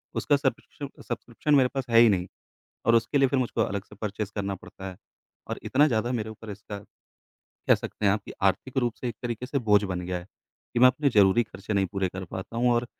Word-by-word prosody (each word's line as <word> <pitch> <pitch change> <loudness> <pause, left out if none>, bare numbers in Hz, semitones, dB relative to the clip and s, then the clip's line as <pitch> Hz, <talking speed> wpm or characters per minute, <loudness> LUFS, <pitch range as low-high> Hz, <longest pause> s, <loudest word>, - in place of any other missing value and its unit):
उसका 145 - +2
सब्शकिशुँ 140 +1 -3 0.2
सब्स्क्रिप्शन 120 +5 -1
मेरे 130 -2 +5
पास 135 -2 -1
है 115 0 +6
ही 120 - +8
नहीं, 95 -2 +1 0.6
और 115 - +5
उसके 115 +5 +3
लिए 135 -1 +5
फिर 135 - +1
मुझको 120 -2 0
अलग 100 -2 -2
से - - -15
परचेज़ 105 -1 -3
करना 100 -1 -1
पड़ता 95 +1 -10
है। 90 - -12 0.5
और - - -2
इतना 145 +3 +4
ज़्यादा 120 0 0
मेरे 110 -2 -2
ऊपर 110 0 -10
इसका, 105 0 -7 0.9
कह - - +8
सकते 105 - -5
हैं 100 - +5
आप 105 - 0
कि - - -8
आर्थिक 125 +7 +1
रूप 120 -3 +1
से 125 - -2
एक 120 - -4
तरीके 120 0 -3
से 140 +1 -1
बोझ 105 0 +5
बन 90 -2 -2
गया 90 0 -3
है, 90 - -11 0.5
कि - - +2
मैं 130 - +9
अपने 140 +3 +1
ज़रूरी 105 +1 +5
खर्चे 105 -1 -7
नहीं 95 -1 +2
पूरे 95 -1 0
कर 95 +1 -6
पाता 95 +6 -7
हूँ 120 +1 +3
और 120 0 +1
110 Hz, 235 wpm, -27 LUFS, 100-125 Hz, 0.9 s, मैं